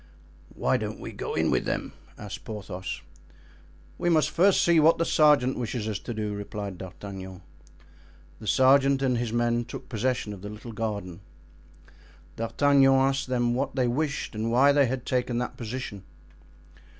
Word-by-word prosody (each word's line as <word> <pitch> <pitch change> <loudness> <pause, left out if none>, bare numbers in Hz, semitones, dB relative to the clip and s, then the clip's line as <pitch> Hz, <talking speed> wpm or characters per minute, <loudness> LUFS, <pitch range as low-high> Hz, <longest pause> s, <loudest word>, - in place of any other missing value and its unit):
"Why - - +1
don't - - -5
we - - -7
go - - -5
in - - +1
with - - +1
them?" - - -3 0.2
asked 105 -2 -8
Porthos. 95 -4 -6 1.0
"We 175 - +1
must 155 -3 +3
first 190 +3 +4
see 170 -1 +5
what 160 +2 +5
the 165 - +1
sergeant 145 -6 +4
wishes 115 -2 -3
us 105 -2 -2
to - - -7
do," 105 -2 -3
replied 100 -2 -6
D'Artagnan. 95 0 -8 1.0
The 110 - -9
sergeant 135 +4 +4
and 125 -3 +1
his 120 -2 -2
men 120 0 +1
took 130 +2 -9
possession 120 -2 -1
of 95 - -10
the 105 - -7
little 105 +3 -9
garden. 100 -5 -4 1.2
D'Artagnan 135 +4 +3
asked 135 +1 +2
them 120 -2 +1
what 135 +2 -2
they 130 -2 +2
wished 140 +4 -2
and 110 +1 -2
why 135 +4 +5
they 140 -2 +4
had 125 0 -3
taken 125 -1 -1
that 125 +1 -3
position. 115 -3 -6
120 Hz, 160 wpm, -27 LUFS, 105-135 Hz, 1.2 s, see